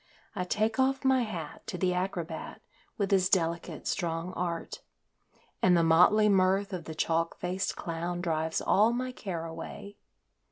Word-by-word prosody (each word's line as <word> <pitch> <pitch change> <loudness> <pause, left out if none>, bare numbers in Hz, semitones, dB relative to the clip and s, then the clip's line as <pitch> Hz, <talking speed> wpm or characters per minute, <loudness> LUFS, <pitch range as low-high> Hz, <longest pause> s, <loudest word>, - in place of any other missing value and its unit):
I 180 -2 -2
take 215 +6 0
off 270 +1 +2
my 265 -1 +4
hat 175 -10 -6
to 180 - -4
the 180 0 +1
acrobat 180 -3 -4 0.4
with 200 -3 -1
his 190 -2 +3
delicate, 170 -2 0
strong 170 +1 -2
art, 170 -1 -4 0.8
And 180 -1 +5
the 170 - +3
motley 180 +6 +5
mirth 195 0 +3
of 175 -3 -5
the 160 - -7
chalk 165 +1 0
faced 185 +2 -2
clown 170 +1 -4
drives 160 -2 -1
all 215 +4 +4
my 255 +1 -2
care 180 -9 -5
away. 200 +5 -8
180 Hz, 155 wpm, -29 LUFS, 165-200 Hz, 0.8 s, And